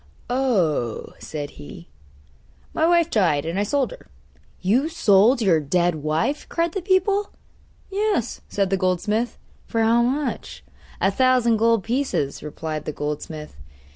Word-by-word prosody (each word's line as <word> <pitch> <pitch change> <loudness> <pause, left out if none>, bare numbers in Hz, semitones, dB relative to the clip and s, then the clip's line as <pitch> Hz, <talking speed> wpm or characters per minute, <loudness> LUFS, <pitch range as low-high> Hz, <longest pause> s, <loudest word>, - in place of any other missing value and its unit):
'Oh,' 185 - 0
said 145 -2 -6
he, 75 +3 -11 0.9
'my 320 - +2
wife 340 -1 +3
died, 165 -9 +2
and 170 +4 -2
I - - +2
sold 270 +6 0
her.' - - -12 0.5
'You 245 - +2
sold 230 - +4
your 175 -6 +4
dead 175 +4 +1
wife?' 155 - -1
cried 335 0 0
the 390 - -3
people. 390 +2 +1 0.6
'Yes,' 400 - -1
said 195 -2 0
the 195 - +2
goldsmith. 205 +6 0 0.3
'For 225 -1 0
how 230 +2 +4
much?' 270 +5 -2 0.4
'A 195 - +3
thousand 250 0 +3
gold 230 -2 +3
pieces,' 240 - -1
replied 155 0 -5
the - - -2
goldsmith. 150 - -5
215 Hz, 140 wpm, -23 LUFS, 160-270 Hz, 0.9 s, sold